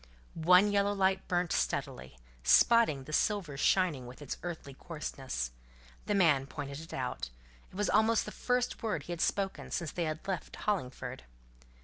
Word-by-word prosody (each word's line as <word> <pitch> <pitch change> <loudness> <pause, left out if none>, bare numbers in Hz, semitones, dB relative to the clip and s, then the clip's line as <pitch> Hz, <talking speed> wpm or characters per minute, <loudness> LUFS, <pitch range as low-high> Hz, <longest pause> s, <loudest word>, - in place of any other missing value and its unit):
One 180 +5 +5
yellow 200 0 +2
light 190 -1 +1
burnt 175 -1 0
steadily, 65 +1 -2 0.3
spotting 220 - +5
the 155 - -9
silver 190 -6 +1
shining 150 -4 +2
with 125 - -11
its 145 -3 -5
earthly 165 -5 -6
coarseness. 135 - -5 0.6
The 210 - +1
man 150 -8 +4
pointed 140 0 -6
it 165 +1 -10
out: 125 - -3 0.4
it - - -17
was 205 +1 0
almost 220 +1 +3
the 210 - -6
first 250 +4 -1
word 210 -10 -2
he 175 - -8
had 170 -1 -3
spoken 195 -1 -1
since 170 -4 -2
they 175 - -2
had 155 +3 -4
left 190 -3 -3
Hollingford. 130 -10 -3
170 Hz, 160 wpm, -32 LUFS, 140-200 Hz, 0.6 s, One